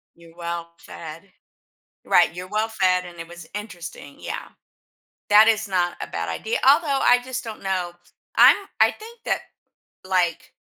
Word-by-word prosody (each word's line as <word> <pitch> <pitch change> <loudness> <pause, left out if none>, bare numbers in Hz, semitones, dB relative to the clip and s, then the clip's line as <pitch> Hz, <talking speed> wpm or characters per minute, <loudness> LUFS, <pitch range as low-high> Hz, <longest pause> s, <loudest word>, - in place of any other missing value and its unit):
You're 170 -1 -18
well 170 -1 -5
fed. 165 +4 -11 0.7
Right, - - +4
you're 180 +1 -7
well 215 +3 -1
fed, 185 -4 +1
and 175 -1 -11
it 165 - -7
was 175 0 -11
interesting. 175 -8 -8
Yeah. - - -6 0.8
That 210 +1 +8
is 220 -1 +2
not 180 -2 0
a - - -4
bad 85 0 -4
idea. 220 - -2
Although, 285 -1 +4
I 245 - +5
just 255 0 -5
don't 225 -2 -8
know. 185 -2 -2 0.4
I'm - - +8 0.2
I - - +5
think 455 +2 -13
that, - - 0 0.6
like 180 -3 -1
185 Hz, 155 wpm, -23 LUFS, 170-220 Hz, 0.8 s, That